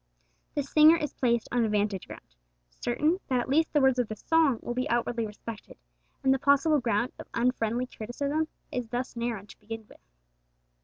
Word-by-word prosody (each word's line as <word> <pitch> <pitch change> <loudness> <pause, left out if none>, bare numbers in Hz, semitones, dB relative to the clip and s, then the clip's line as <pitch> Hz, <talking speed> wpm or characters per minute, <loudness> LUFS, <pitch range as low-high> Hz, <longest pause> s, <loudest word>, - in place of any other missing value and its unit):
The 290 - 0
singer 305 +4 +6
is 300 -3 -3
placed 235 -3 +1
on 245 -1 +2
a 220 - +1
vantage 205 -2 -1
ground, - - -12 0.4
certain 300 - 0
that 255 -2 +1
at 240 - -2
least 315 +4 +3
the 295 - +3
words 265 -1 +4
of 245 - +1
the 215 - -5
song 315 0 +2
will 240 - -3
be 255 +4 -2
outwardly 235 -1 0
respected, 210 +1 -9 0.5
and 265 - +5
the 270 - 0
possible 285 +2 +4
ground 235 -1 0
of - - -9
unfriendly 240 0 +1
criticism 280 +7 -3 0.4
thus 245 +2 -3
narrowed 230 -4 -3
to - - -14
begin 225 +1 -7
with. - - -18
245 Hz, 185 wpm, -28 LUFS, 225-280 Hz, 0.5 s, singer